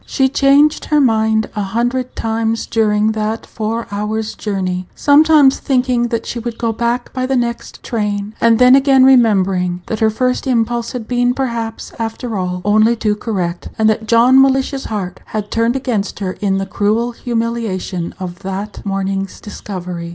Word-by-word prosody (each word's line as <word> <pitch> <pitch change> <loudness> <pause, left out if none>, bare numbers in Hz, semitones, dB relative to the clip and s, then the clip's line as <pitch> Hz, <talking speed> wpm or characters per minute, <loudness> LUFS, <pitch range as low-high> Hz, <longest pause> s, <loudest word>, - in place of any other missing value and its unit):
She 265 -1 +1
changed 285 +2 +3
her 300 - +2
mind 220 -4 +2
a 210 - -1
hundred 240 +5 -2
times 225 0 -1
during 215 -1 +1
that 220 +1 -3
four 225 +1 -3
hours 215 +2 -3
journey, 185 -3 -3
sometimes 295 -1 +5
thinking 250 -2 +1
that 230 -1 -3
she 240 - -4
would 235 0 -5
go 230 -1 -1
back 235 +2 -2
by 255 -1 -2
the 265 - 0
next 235 -1 -3
train, 210 -2 -3
and 230 -1 +4
then 250 +2 +7
again 270 -1 +5
remembering 190 -8 +3
that 220 - -4
her 220 - +3
first 250 +4 -1
impulse 235 -1 0
had 235 -4 -6
been, 245 0 +1
perhaps, 235 -4 -4
after 225 +1 -4
all, 180 -1 -3
only 215 +3 +4
too 215 -2 0
correct, 180 -6 -3
and 220 - +3
that 220 0 -4
John 245 +3 +5
Mellish's 270 0 +1
heart 195 -4 -4
had 210 -1 -5
turned 230 +2 +1
against 240 -7 -2
her 195 -3 -3
in 195 -2 +1
the 195 - -2
cruel 215 +5 0
humiliation 230 -7 -3
of 180 -1 -6
that 195 +2 -6
morning's 195 -1 -3
discovery. 180 -5 -7
225 Hz, 165 wpm, -16 LUFS, 205-245 Hz, -, then